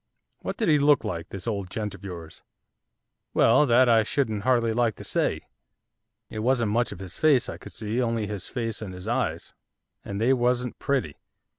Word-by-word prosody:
'What - - -5
did 225 - 0
he 150 -2 +5
look 145 0 +4
like, 85 -1 -4
this 95 -2 -7
old 100 -5 -3
gent 105 0 -4
of 100 0 -13
yours?' 85 -4 -8 0.9
'Well, 150 - +5
that 125 +1 +5
I 115 -1 +5
shouldn't 110 -3 -1
hardly 120 -1 +2
like 115 -2 +1
to - - -10
say. - - 0 0.9
It 110 - -6
wasn't 120 -2 +1
much 120 +3 +1
of - - -7
his 95 -1 -9
face 145 -6 +4
I - - -6
could - - -11
see, 110 +3 -2
only 115 -3 0
his 100 -3 -5
face 115 -3 -3
and 95 -4 -6
his 90 - -9
eyes, - - -2 0.5
and 100 0 -5
they 120 +4 +4
wasn't 125 -1 0
pretty. 135 - -1
115 Hz, 190 wpm, -26 LUFS, 100-125 Hz, 0.9 s, he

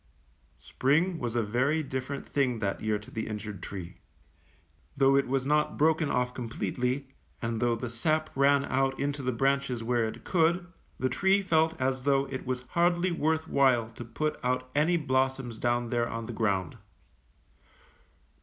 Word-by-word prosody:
^^ - - -41 0.5
Spring 160 +6 +1
was 120 -1 -3
a 120 - +2
very 130 +9 +1
different 130 0 -4
thing 130 -4 +1
that 100 -3 -2
year 110 -1 0
to 105 - -13
the 110 - -4
injured 105 -3 -6
tree. 90 -3 -7 1.0
Though 135 0 +5
it 140 - +3
was 135 0 0
not 150 +1 +1
broken 160 0 +3
off 125 0 0
completely, 125 +2 -2 0.3
and 115 -1 -2
though 120 -1 +2
the 125 +2 -4
sap 155 +7 0
ran 140 +1 +4
out 135 0 0
into 140 0 -1
the 130 -1 0
branches 135 -1 0
where 120 0 +1
it 110 - -8
could, 175 0 +2 0.3
the 130 - 0
tree 195 +9 +2
felt 160 -2 +2
as 130 0 0
though 135 0 +2
it 130 -1 -5
was 125 -1 -2
hardly 175 +1 +2
worth 160 -1 0
while 125 -6 +3
to 120 - -8
put 135 +7 -3
out 125 0 -1
any 160 +4 +3
blossoms 130 -5 -1
down 120 0 0
there 120 -1 0
on 115 0 -4
the 120 - -6
ground. 100 -6 -1
130 Hz, 170 wpm, -29 LUFS, 120-145 Hz, 1.0 s, Though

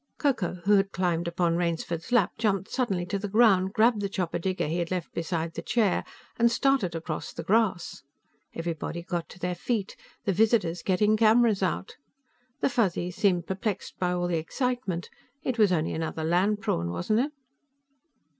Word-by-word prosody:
Ko 285 -2 +3
Ko, 180 -7 -3
who 205 +1 +5
had 195 0 +1
climbed 170 -2 0
upon 170 0 +1
Rainsford's 170 +2 -2
lap, 240 -7 +4
jumped 200 -3 0
suddenly 195 -9 0
to 195 +3 -2
the 205 - -3
ground, 195 -3 +4
grabbed 220 +1 +3
the 200 - -1
chopper 185 -3 -2
digger 185 +2 -1
he 160 +3 -1
had 170 -1 -2
left 180 -3 -3
beside 165 -1 -2
the - - -5
chair 215 -6 +1 0.4
and 235 0 +5
started 260 -9 +1
across 160 -1 -4
the 165 - -6
grass. 195 -2 +1 0.5
Everybody 165 0 -4
got 175 -1 -3
to - - -12
their 180 0 -2
feet, 210 +1 -2 0.3
the 195 - +2
visitors 205 -4 +2
getting 210 +3 +2
cameras 225 -1 +4
out. 190 0 -2 0.6
The - - +3
Fuzzies 180 -7 0
seemed 180 -4 +2
perplexed 195 +2 -3
by 180 -1 +1
all 175 0 0
the 175 -1 0
excitement. 245 - -2 0.4
It 250 -3 -2
was 210 -3 +5
only 160 -3 0
another 160 0 -3
land 190 +6 +2
prawn, 85 - -1
wasn't 90 - 0
it? 280 +4 0
185 Hz, 175 wpm, -27 LUFS, 170-215 Hz, 0.6 s, who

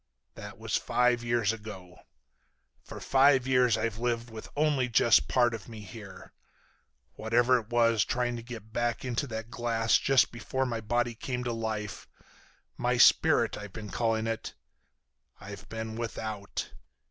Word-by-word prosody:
"That - - -10
was - - -3
five 125 -1 +1
years 115 -2 +1
ago. 95 -5 -10 0.8
For - - -9
five 135 -1 +4
years 125 -3 +3
I've 110 -1 -2
lived 120 -1 -2
with 110 -1 -9
only 145 -4 +1
just 115 0 +4
part 120 -2 +2
of 110 -2 -7
me 110 -2 -9
here. 100 -1 -11 0.8
Whatever 120 +3 +2
it 110 -1 -12
was 115 -3 +3
trying 120 -1 -1
to 115 - -6
get 115 -2 -10
back 120 +1 -1
into 125 +3 -2
that 110 -1 -6
glass 115 -2 +1
just 135 -2 +3
before 120 +3 -2
my 115 -3 -3
body 120 +2 0
came 125 +2 -4
to 120 -1 -2
life—my 110 -2 -5
spirit, - - +5
I've 105 -2 -9
been 105 -2 -8
calling 115 -1 0
it—I've 100 -2 -10
been 110 0 -5
without. 110 -3 -5
115 Hz, 145 wpm, -29 LUFS, 110-120 Hz, 0.8 s, spirit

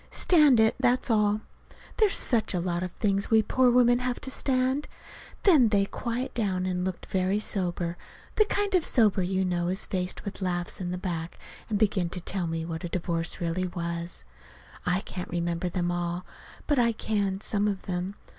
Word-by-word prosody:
Stand 300 -9 +5
it, 220 0 +5
that's 250 0 +2
all. 210 -1 +2 0.6
There's 430 -3 +4
such 225 -6 +1
a - - +1
lot 175 0 -1
of 180 -1 -3
things 200 -2 0
we 220 -1 +5
poor 255 +4 +3
women 245 0 +5
have 250 -1 -2
to 265 - -5
stand!) 260 +2 0 0.6
Then 295 - +6
they 200 -2 +3
quieted 240 +4 -4
down 190 -5 -1
and 180 -1 -1
looked 185 -1 -4
very 190 +1 0
sober 175 -4 -2 0.4
the 430 - +4
kind 405 -1 -1
of 365 -3 +4
sober 215 -9 +3
you 190 +1 0
know 175 -1 0
is 190 +3 -1
faced 180 -2 -3
with 200 0 -6
laughs 175 0 -2
in 175 - -3
the 180 - -3
back 170 -3 -4 0.3
and 210 - +1
began 195 -5 +1
to 180 - -5
tell 180 0 -3
me 165 0 -3
what 165 +1 -5
a 175 - -3
divorce 170 -1 -2
really 175 +1 -1
was. 170 - -4 0.6
I 180 +2 +2
can't 180 -2 -7
remember 170 +1 -1
them 175 -1 -1
all, 175 +1 -3 0.4
but 290 -4 +2
I 235 -1 +3
can 200 -3 -1
some 205 -1 +1
of 200 -2 -2
them. 185 +2 -3
190 Hz, 190 wpm, -27 LUFS, 175-230 Hz, 0.6 s, Then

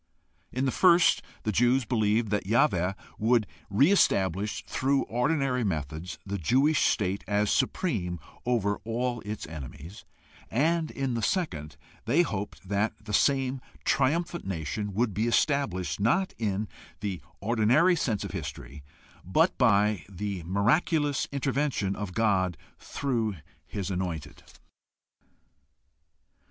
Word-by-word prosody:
In 130 +2 -1
the 130 - +1
first 175 +2 +5 0.2
the 110 - 0
Jews 125 +4 +3
believed 110 -2 +1
that 105 -2 -1
Yahweh 100 - +2 0.3
would 115 0 +3 0.2
re 135 - +4
establish 100 - +2
through 135 +1 +1
ordinary 130 0 0
methods 80 -2 -3
the 100 0 -3
Jewish 135 - +3
state 100 -2 0
as 105 0 +1
supreme 105 - 0 0.2
over 105 -5 +1
all 120 +1 -2
its 105 0 -5
enemies; 80 - -9 0.5
and 160 +6 +1
in 135 -2 -2
the 115 - -1
second 80 - -2 0.3
they 170 +4 +4
hoped 100 - -5
that 105 +3 0
the 105 - -5
same 135 +1 +2 0.2
triumphant 170 +5 +1
nation 95 +4 -3
would 115 -1 +1
be 110 +5 0
established, 120 - +1
not 155 - +2
in 105 -1 -1 0.3
the 95 -4 -3 0.2
ordinary 120 - +3
course 115 - -1
of - - -5
history, 70 +4 -7 0.4
but 160 - +2
by 105 - +3
the 100 -1 -4
miraculous 145 - +1
intervention 135 -7 0
of 100 -3 -5
God 95 -7 +2 0.2
through 115 -7 -2 0.3
his 100 -1 -4
Anointed. 85 -6 -4
110 Hz, 120 wpm, -28 LUFS, 95-135 Hz, 0.5 s, first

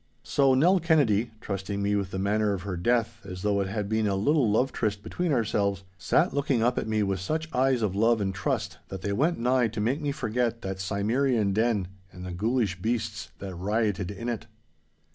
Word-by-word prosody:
So 135 - +3
Nell 175 +8 +4
Kennedy, 135 - +3
trusting 100 -1 -4
me 100 0 +1
with 100 -2 -1
the 95 - -5
manner 105 +2 +1
of 95 -3 -4
her 100 -2 -3
death 115 +4 0
as 90 -2 -8
though 100 -1 +2
it 95 - -1
had 100 +1 -3
been 110 0 +1
a 100 - +1
little 130 +4 +2
love 125 +6 +2
tryst 105 -2 -2
between 175 -2 -2
ourselves, 100 -6 0 0.2
sat 80 - +2
looking 140 -4 +1
up 125 +1 +2
at - - -4
me 110 -1 +1
with 95 -1 -1
such 155 - -2
eyes 130 -2 +2
of 100 -3 0
love 115 +2 +3
and 95 -1 -1
trust 95 -1 -2
that 95 -1 -7
they 100 - -1
went 155 +11 +1
nigh 125 0 +2
to 110 0 -6
make 125 +8 0
me 145 -1 -1
forget 120 -2 -1
that 95 0 -4
Cimmerian 110 +2 +1
den 110 -3 +1 0.2
and 90 0 -9
the 90 - -5
ghoulish 105 -1 0
beasts 110 -1 -2
that 95 -1 -7
rioted 100 0 -1
in 105 +4 -6
it. 120 -3 -3
110 Hz, 210 wpm, -27 LUFS, 100-120 Hz, 0.2 s, Nell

